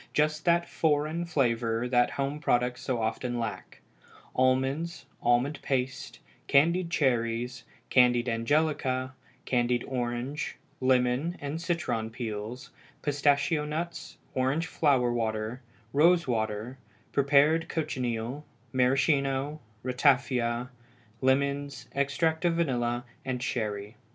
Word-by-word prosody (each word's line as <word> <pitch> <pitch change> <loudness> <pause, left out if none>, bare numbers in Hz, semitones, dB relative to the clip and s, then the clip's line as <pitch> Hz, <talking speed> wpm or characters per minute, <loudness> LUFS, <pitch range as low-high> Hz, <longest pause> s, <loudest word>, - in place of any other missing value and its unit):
just 155 +1 +1
that 170 0 +3
"foreign" 155 +2 0
flavor 120 -6 0
that 120 -1 +3
home 140 +2 -2
products 125 -3 +1
so 125 -3 -1
often 120 +2 -2
lack: 115 -2 -5 0.5
almonds, 130 +5 +1 0.2
almond 125 +5 +2
paste, 130 -1 -2 0.3
candied 170 +5 +3
cherries, 120 -4 0 0.3
candied 125 -1 +4
angelica, 130 +1 0 0.3
candied 120 -1 +1
orange, 125 +2 -3 0.2
lemon, 130 +6 +2
and 145 +3 -4
citron 165 -11 -1
peels, 115 0 -6 0.3
pistachio 145 +2 +2
nuts, 160 +3 -5 0.2
orange 135 +6 +1
flower 130 -8 +2
water, 110 +1 -2 0.3
rose 170 +3 +4
water, 110 +2 -2 0.3
prepared 145 +3 +3
cochineal, 125 -3 -2 0.3
maraschino, 135 +2 +2 0.2
ratafia, 125 -2 +2 0.5
lemons, 140 0 0
extract 150 +4 0
of 170 -1 +2
vanilla, 120 -6 0 0.2
and 130 -1 -3
sherry. 105 -2 -3
130 Hz, 100 wpm, -28 LUFS, 120-150 Hz, 0.5 s, candied